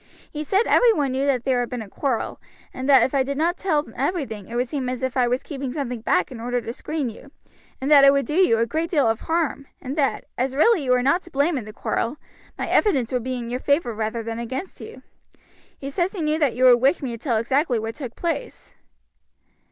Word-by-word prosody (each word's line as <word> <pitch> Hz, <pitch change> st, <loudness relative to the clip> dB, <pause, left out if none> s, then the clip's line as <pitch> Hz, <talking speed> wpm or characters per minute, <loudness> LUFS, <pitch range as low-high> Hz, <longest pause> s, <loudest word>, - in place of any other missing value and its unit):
He 300 Hz, 0 st, -4 dB
said 390 Hz, +8 st, +2 dB
every -, -, +5 dB
one 290 Hz, -10 st, 0 dB
knew 270 Hz, +2 st, 0 dB
there 250 Hz, +1 st, 0 dB
had 245 Hz, -, -2 dB
been 245 Hz, -3 st, -4 dB
a -, -, -12 dB
quarrel, 250 Hz, +4 st, -3 dB, 0.3 s
and 260 Hz, +2 st, -4 dB
that 265 Hz, -4 st, +7 dB
if 260 Hz, -, 0 dB
I 275 Hz, -, +3 dB
did 275 Hz, +1 st, -2 dB
not 335 Hz, +3 st, +1 dB
tell 310 Hz, -7 st, 0 dB
everything 240 Hz, -, -3 dB
it 235 Hz, -, -7 dB
would 250 Hz, +1 st, 0 dB
seem 265 Hz, -2 st, -3 dB
as 255 Hz, 0 st, -4 dB
if 260 Hz, -1 st, -2 dB
I 250 Hz, -2 st, +3 dB
was 250 Hz, +2 st, -1 dB
keeping 275 Hz, -4 st, -5 dB
something 250 Hz, -5 st, -4 dB
back 180 Hz, -3 st, +1 dB
in 245 Hz, -, -8 dB
order 245 Hz, +1 st, -1 dB
to 230 Hz, 0 st, -6 dB
screen 305 Hz, +1 st, -3 dB
you, 270 Hz, +5 st, -14 dB, 0.5 s
and 270 Hz, +3 st, -2 dB
that 275 Hz, -2 st, +8 dB
would 275 Hz, -2 st, +1 dB
do 300 Hz, -, -4 dB
you 355 Hz, -9 st, +4 dB
a 230 Hz, -, +2 dB
great 320 Hz, +8 st, -2 dB
deal 290 Hz, -8 st, +2 dB
of 225 Hz, 0 st, 0 dB
harm, 320 Hz, -4 st, -1 dB
and 270 Hz, +1 st, -5 dB
that, 280 Hz, -3 st, 0 dB
as 260 Hz, +1 st, -1 dB
really 350 Hz, +3 st, +4 dB
you -, -, -3 dB
were 250 Hz, 0 st, +3 dB
not 280 Hz, +8 st, +2 dB
to 350 Hz, -, -14 dB
blame 295 Hz, +2 st, +1 dB
in 250 Hz, -6 st, -3 dB
the 215 Hz, -, -8 dB
quarrel, 235 Hz, +5 st, -2 dB, 0.4 s
my -, -, -3 dB
evidence 275 Hz, -, +2 dB
would 250 Hz, -2 st, -1 dB
be 255 Hz, +1 st, -3 dB
in 240 Hz, -1 st, -5 dB
your 250 Hz, -, -2 dB
favor 280 Hz, -3 st, +1 dB
rather 220 Hz, +1 st, -3 dB
than 230 Hz, +1 st, -5 dB
against 260 Hz, +10 st, -6 dB
you. 450 Hz, -, -10 dB, 0.7 s
He 275 Hz, 0 st, -6 dB
says 350 Hz, +6 st, -1 dB
he 380 Hz, -, -4 dB
knew 305 Hz, +1 st, +1 dB
that 285 Hz, -7 st, +1 dB
you 255 Hz, -, 0 dB
would 245 Hz, -2 st, +7 dB
wish 275 Hz, +4 st, +2 dB
me 255 Hz, -, -2 dB
to 230 Hz, -, -5 dB
tell 240 Hz, -2 st, 0 dB
exactly 260 Hz, +3 st, +1 dB
what 225 Hz, +1 st, -3 dB
took 255 Hz, -4 st, -8 dB
place." 345 Hz, +8 st, -4 dB
265 Hz, 245 wpm, -23 LUFS, 240-300 Hz, 0.7 s, that